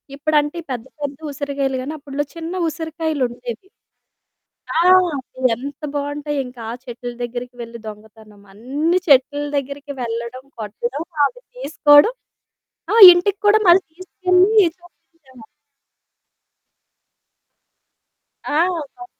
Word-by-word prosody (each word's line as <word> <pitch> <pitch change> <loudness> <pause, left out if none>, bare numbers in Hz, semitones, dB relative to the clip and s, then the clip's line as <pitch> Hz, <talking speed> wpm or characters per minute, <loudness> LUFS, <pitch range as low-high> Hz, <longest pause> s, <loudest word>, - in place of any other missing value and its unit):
ఇప్పుడంటే 295 +1 0
ఈ - - -17
పెద్ద 240 -3 -5 0.2
పెద్ద 280 -1 -4
ఉసిరికాయలు 275 -1 -3
గానీ, 290 +4 -5
అప్పట్లో 285 0 -4
చిన్న 335 +2 -6
ఉసిరికాయలుండేవి. 305 - -4 1.1
ఆ! - - +4 0.6
అవి 255 -1 +2
ఎంత 275 +5 -9
బావుంటాయింక 285 -3 -4
ఆ - - -4
చెట్లు 245 -1 -7
దగ్గరికి 245 +1 -6
వెళ్లి 235 0 -9
దొంగతనం. 215 -1 -13
అన్ని 290 - -1
చెట్ల 285 +1 +3
దగ్గరికి 280 +1 -5
వెళ్లడం, 235 +2 -5 0.2
కొట్టడం 240 +8 -5 0.2
అవి - - -5 0.2
తీసుకోవడం. 295 +1 +4 0.8
ఆ! - - +2 0.2
ఇంటికి 365 +3 +1
కూడా 430 +1 +5
మళ్ళీ 355 +2 +6
తీసుకెళ్ళి 370 +1 +2 0.3
చూపించేవాళ్ళం. 290 -8 -20 3.0
ఆ! - - -4 0.4
కొ 365 - -10
280 Hz, 105 wpm, -19 LUFS, 245-320 Hz, 3.0 s, మళ్ళీ